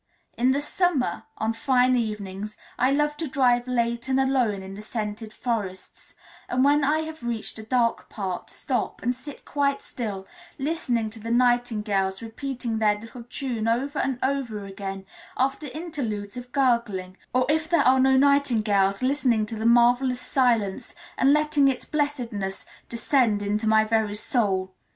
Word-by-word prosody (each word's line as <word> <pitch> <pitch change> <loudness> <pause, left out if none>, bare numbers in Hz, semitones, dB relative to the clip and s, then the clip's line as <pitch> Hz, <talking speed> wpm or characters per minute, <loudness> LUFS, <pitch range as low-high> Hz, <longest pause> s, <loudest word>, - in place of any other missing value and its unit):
In 245 +2 +2
the 280 +2 +1
summer, 305 -3 0
on 220 +1 0
fine 255 +1 +3
evenings, 210 -2 -3 0.2
I 255 +2 +3
love 295 +1 +1
to 325 - -3
drive 250 -2 +2
late 235 0 -1
and 265 0 +2
alone 250 -7 +1
in 190 0 -8
the 200 - -8
scented 215 0 -5
forests, 210 -6 -5 0.3
and 255 +2 +2
when 290 +1 +4
I 305 +3 +2
have 315 -1 -7
reached 235 -2 -4
a - - -7
dark 235 0 0
part 190 -4 -4
stop, 255 -3 -3
and 245 +2 +1
sit 280 +3 -10
quite 280 -1 0
still, 205 -6 -5 0.3
listening 265 -7 -1
to 225 - -9
the 225 +2 -6
nightingales 230 -5 +1
repeating 235 -1 -4
their 210 -1 +2
little 230 +2 -10
tune 245 -5 -3
over 270 +6 0
and 265 -1 0
over 250 -7 -1
again 195 0 -6 0.3
after 270 +3 0
interludes 250 - -4
of 245 0 -8
gurgling, 235 -9 +1 0.2
or 255 0 +2
if 315 +2 +1
there 335 -4 +4
are 260 +1 +5
no 265 0 +5
nightingales, 225 -8 +3
listening 255 -5 +2
to 225 - -4
the 220 +1 0
marvellous 245 +2 +4
silence, 230 -7 0 0.2
and 270 - +4
letting 300 -1 +3
its 265 -2 0
blessedness 245 -10 -2 0.2
descend 235 -3 +2
into 210 +2 -1
my 220 0 +5
very 220 -1 0
soul. 195 -4 0
240 Hz, 160 wpm, -25 LUFS, 215-270 Hz, 0.3 s, are